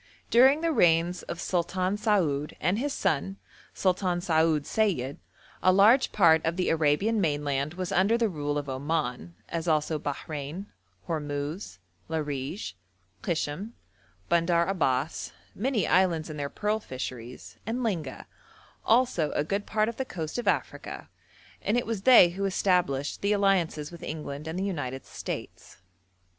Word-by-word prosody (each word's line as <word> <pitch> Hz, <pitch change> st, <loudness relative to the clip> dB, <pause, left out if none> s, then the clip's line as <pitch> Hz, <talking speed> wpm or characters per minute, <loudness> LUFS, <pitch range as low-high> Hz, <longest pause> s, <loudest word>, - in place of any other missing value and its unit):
During 265 Hz, +6 st, +6 dB
the 335 Hz, 0 st, +1 dB
reigns 175 Hz, -, +3 dB
of 170 Hz, -, -7 dB
Sultan 185 Hz, +2 st, 0 dB
Saoud 175 Hz, -10 st, 0 dB
and 180 Hz, +7 st, +1 dB
his 285 Hz, +3 st, -1 dB
son 190 Hz, -, -1 dB, 0.4 s
Sultan 185 Hz, -1 st, +1 dB
Saoud 160 Hz, -4 st, +2 dB
Sayid, 160 Hz, -, 0 dB, 0.4 s
a 185 Hz, -, +5 dB
large 215 Hz, +8 st, +5 dB
part 160 Hz, -5 st, +5 dB
of 165 Hz, +1 st, 0 dB
the 180 Hz, -, +1 dB
Arabian 165 Hz, +8 st, +2 dB
mainland 145 Hz, -1 st, -1 dB
was 185 Hz, +1 st, -4 dB
under 195 Hz, +5 st, +3 dB
the 235 Hz, -1 st, +2 dB
rule 145 Hz, -5 st, -2 dB
of 145 Hz, -1 st, -3 dB
Oman, 130 Hz, -, -2 dB
as 170 Hz, 0 st, -4 dB
also 155 Hz, -1 st, +1 dB
Bahrein, 145 Hz, +4 st, -5 dB, 0.4 s
Hormuz, 150 Hz, -, -4 dB, 0.3 s
Larij, 135 Hz, -, -3 dB, 0.5 s
Kishm, 170 Hz, +6 st, -2 dB, 0.5 s
Bandar 170 Hz, 0 st, +3 dB
Abbas, 150 Hz, -6 st, -1 dB, 0.2 s
many 230 Hz, -4 st, 0 dB
islands 170 Hz, -4 st, +2 dB
and 150 Hz, -, -7 dB
their 140 Hz, 0 st, -2 dB
pearl 210 Hz, +6 st, -1 dB
fisheries, 125 Hz, -, -7 dB
and 245 Hz, +3 st, -2 dB
Linga, 165 Hz, -, -3 dB, 0.6 s
also 225 Hz, -10 st, +3 dB
a 145 Hz, -, +1 dB
good 200 Hz, +6 st, -2 dB
part 215 Hz, 0 st, +1 dB
of 230 Hz, -, -4 dB
the 265 Hz, -, -1 dB
coast 165 Hz, -5 st, -5 dB
of 240 Hz, -, -5 dB
Africa; -, -, -2 dB, 0.5 s
and 215 Hz, -, +1 dB
it 245 Hz, -, 0 dB
was 225 Hz, -3 st, -3 dB
they 220 Hz, -6 st, +8 dB
who 195 Hz, +3 st, -3 dB
established 180 Hz, -8 st, +1 dB
the 200 Hz, +1 st, +2 dB
alliances 185 Hz, -7 st, +1 dB
with 170 Hz, -, -11 dB
England 150 Hz, -1 st, -6 dB
and 160 Hz, +2 st, -4 dB
the 190 Hz, -, -1 dB
United 135 Hz, -9 st, -3 dB
States. -, -, -7 dB
170 Hz, 145 wpm, -28 LUFS, 145-200 Hz, 0.6 s, they